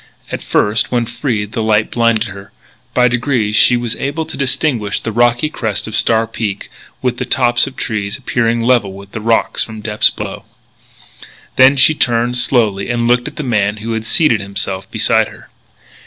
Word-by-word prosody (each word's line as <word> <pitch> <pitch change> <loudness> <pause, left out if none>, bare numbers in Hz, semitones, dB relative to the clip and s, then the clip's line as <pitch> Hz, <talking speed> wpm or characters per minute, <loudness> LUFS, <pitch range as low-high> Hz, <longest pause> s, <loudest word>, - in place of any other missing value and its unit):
At - - -4
first, 105 +2 0
when 120 -1 +1
freed, 115 -4 -3
the 115 -1 -3
light 110 -1 +1
blinded 115 -2 +2
her. 100 +1 -11 0.4
By 125 -1 +4
degrees 120 -3 0
she 120 +3 +5
was 120 -2 -3
able 145 +4 -3
to - - -8
distinguish 130 -6 0
the 115 - -4
rocky 120 +5 +2
crest 110 -10 -3
of 110 - -5
Star 115 0 +2
Peak, 110 -3 -5 0.3
with 125 -1 0
the - - -2
tops 120 -2 +2
of - - -8
tall - - -4
trees 105 -3 -3
appearing 115 -3 0
level 115 -5 +2
with 100 0 -12
the 110 - -6
rocks 115 +1 +1
from 110 -1 -9
depths 105 0 +3
below. - - -7 1.1
Then 130 +2 +6
she 140 +3 +5
turned, 120 -3 +1
slowly, 110 -6 +1
and 120 -1 0
looked 120 0 +2
at - - -8
the 155 - -4
man 105 -5 0
who 110 +2 -5
had 110 -1 -3
seated 120 -6 +2
himself 100 -1 -3
beside - - +2
her. - - -15
115 Hz, 185 wpm, -15 LUFS, 105-125 Hz, 1.1 s, Then